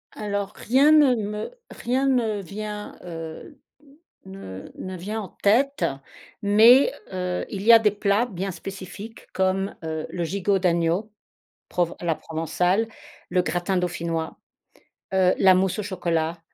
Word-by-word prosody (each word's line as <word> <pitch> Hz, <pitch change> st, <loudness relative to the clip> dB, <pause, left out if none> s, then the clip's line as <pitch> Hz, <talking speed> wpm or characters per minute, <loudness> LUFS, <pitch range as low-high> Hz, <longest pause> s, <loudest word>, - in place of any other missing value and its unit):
Alors 205 Hz, -1 st, -3 dB
rien 270 Hz, +6 st, +4 dB
ne 290 Hz, -5 st, +6 dB
me 210 Hz, -, -4 dB, 0.2 s
rien 260 Hz, +3 st, -1 dB
ne 230 Hz, -6 st, +1 dB
vient 210 Hz, +3 st, -6 dB
heu 165 Hz, -, -8 dB, 0.7 s
ne 190 Hz, -, -9 dB
ne 185 Hz, 0 st, -6 dB
vient 210 Hz, +5 st, -4 dB
en 200 Hz, -, -6 dB
tête, 270 Hz, +8 st, +2 dB, 0.6 s
mais 230 Hz, -, +6 dB, 0.2 s
heu, 180 Hz, -1 st, -2 dB
il 195 Hz, -2 st, -5 dB
y 230 Hz, +2 st, +8 dB
a 230 Hz, -, +9 dB
des 215 Hz, -2 st, +3 dB
plats 205 Hz, +2 st, +1 dB
bien 195 Hz, -2 st, -4 dB
spécifiques 195 Hz, +5 st, -9 dB
comme, 190 Hz, +1 st, 0 dB
heu, 160 Hz, -1 st, -3 dB
le 175 Hz, -, -3 dB
gigot 195 Hz, +3 st, 0 dB
d'agneau, 175 Hz, +3 st, +1 dB, 0.6 s
prov 175 Hz, -1 st, 0 dB
à -, -, -7 dB
la 165 Hz, -2 st, +2 dB
provençale, 175 Hz, +6 st, 0 dB, 0.4 s
le 180 Hz, -, +3 dB
gratin 175 Hz, +3 st, -1 dB
dauphinois, 170 Hz, -2 st, -2 dB, 0.8 s
heu, 185 Hz, -1 st, +4 dB
la 190 Hz, -1 st, +6 dB
mousse 190 Hz, +1 st, +1 dB
au -, -, -3 dB
chocolat 170 Hz, -4 st, -2 dB
195 Hz, 140 wpm, -24 LUFS, 175-215 Hz, 0.8 s, a